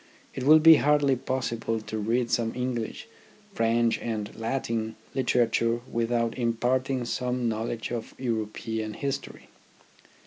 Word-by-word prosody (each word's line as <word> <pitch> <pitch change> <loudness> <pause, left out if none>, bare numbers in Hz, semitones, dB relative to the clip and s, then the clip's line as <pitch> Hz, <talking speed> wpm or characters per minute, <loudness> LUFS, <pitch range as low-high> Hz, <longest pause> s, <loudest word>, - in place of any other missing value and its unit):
It - - -5
will 155 +2 +8
be 160 0 +8
hardly 145 -2 +3
possible 115 -3 -2
to 110 0 -6
read 115 +3 0
some 115 -1 0
English, 125 -3 -3 0.5
French, 115 0 +2
and 110 -3 -4
Latin 115 -1 -2 0.2
literature 120 -2 +1
with 115 0 -2
out 115 -1 +1
imparting 125 +2 0
some 125 0 -1
knowledge 115 +1 -3
of 120 -2 -5
European 110 -2 -3
history. 140 -1 -5
115 Hz, 125 wpm, -27 LUFS, 115-125 Hz, 0.5 s, will